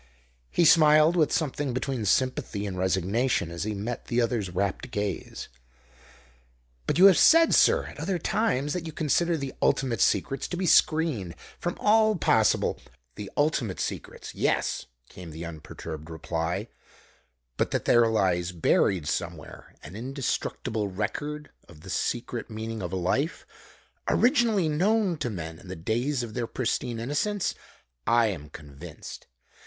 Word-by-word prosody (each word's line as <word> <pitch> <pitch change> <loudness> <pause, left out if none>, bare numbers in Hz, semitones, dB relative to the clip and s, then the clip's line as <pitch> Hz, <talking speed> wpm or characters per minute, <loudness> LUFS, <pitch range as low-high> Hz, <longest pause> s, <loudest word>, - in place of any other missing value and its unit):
He 170 - +2
smiled, 155 +1 +6
with 155 -4 +3
something 145 -3 -1
between 130 -3 -2
sympathy 105 -2 0
and 95 -2 -4
resignation 95 +2 0
as 85 +3 -4
he 110 -1 -2
met 115 +4 -5
the 120 - 0
other's 115 -5 0
rapt 95 +7 -2
gaze. 105 -5 -4 1.4
"But - - +1
you 185 - +7
have 195 -3 +7
said, 330 0 +6
sir, - - +4
at - - -10
other 190 -2 -1
times, 160 - 0
that 175 -2 -4
you 160 - -7
consider 165 +2 +1
the 135 -2 -5
ultimate 130 -4 +1
secrets 135 -2 +1
to 175 - -4
be 185 - -1
screened 155 - +2 0.2
from 175 - -3
all 215 0 +4
possible 110 - +2 0.2
" - - -45
"The 100 -2 -7
ultimate 145 -10 0
secrets, - - -5
yes," - - -1 0.2
came 90 +4 -11
the 80 +2 -7
unperturbed 80 -1 -8
reply; 80 +5 -3 0.9
"but - - 0
that - - -2
there 120 -1 +5
lies 90 -5 +1
buried 85 0 +2
somewhere - - -5
an 80 +7 -10
indestructible 115 -3 -3
record 145 +10 -4 0.2
of 80 -3 -15
the 95 +2 -9
secret 120 +1 -2
meaning 110 0 -5
of 90 -2 -4
life, 95 - -1 0.6
originally 235 - +3
known 190 +5 +2
to 140 -5 -2
men 80 -5 -6
in - - -15
the 95 - -6
days 120 - -1
of 115 -2 -7
their 120 0 -2
pristine 120 -1 -2
innocence, 160 - -1 0.5
I 115 -1 +4
am 75 -7 -6
convinced. 70 -2 -11
115 Hz, 150 wpm, -27 LUFS, 95-150 Hz, 1.4 s, you